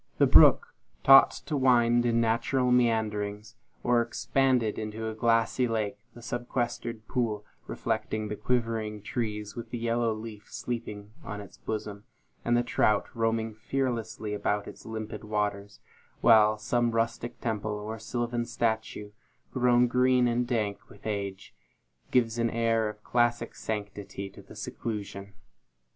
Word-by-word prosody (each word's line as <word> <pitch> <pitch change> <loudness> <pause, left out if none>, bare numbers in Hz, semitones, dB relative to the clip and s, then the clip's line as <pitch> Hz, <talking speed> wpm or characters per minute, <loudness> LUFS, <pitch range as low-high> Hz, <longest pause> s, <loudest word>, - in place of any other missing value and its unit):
The - - +5
brook, - - +6 0.3
taught 135 0 +9 0.2
to 155 - -2
wind 120 -3 +4
in 115 0 +2
natural 125 +3 +1
meanderings, 110 -3 0 0.3
or 120 -1 +3
expand 130 +1 +1
into 110 0 -3
a 110 - -3
glassy 115 +2 +2
lake 105 -3 -2 0.2
the 120 - -12
sequestered 120 -2 -3
pool, 110 -5 -1 0.2
reflecting 110 0 -2
the 105 - -4
quivering 115 -3 -1
trees, 105 -2 -3
with 115 -1 -7
the 120 - -4
yellow 115 0 0
leaf 110 -1 -8
sleeping 105 -4 -5
on 105 -1 -6
its 100 - -11
bosom, 105 -1 -5 0.4
and 120 0 +2
the 120 - +2
trout 105 -3 +1
roaming 115 -1 0
fearlessly 110 -2 -3
about 105 0 -1
its - - -11
limpid 110 -1 -6
waters; 105 -1 -2 0.4
while 110 -2 +6
some 120 +2 +1
rustic 115 +1 -2
temple, 110 -2 -2
or 105 +2 -5
sylvan 120 +2 -2
statue, 110 -3 -2 0.4
grown 125 -1 +4
green 125 0 +3
and 120 +1 0
dank 105 -4 -1
with 100 - -17
age, 100 -3 -4 0.6
gives 120 -2 +2
an 115 0 +2
air 115 -1 +1
of 105 0 -11
classic 120 -1 +1
sanctity 100 -2 -5
to - - -13
the - - -14
seclusion. 100 -3 -6
115 Hz, 140 wpm, -28 LUFS, 105-120 Hz, 0.6 s, taught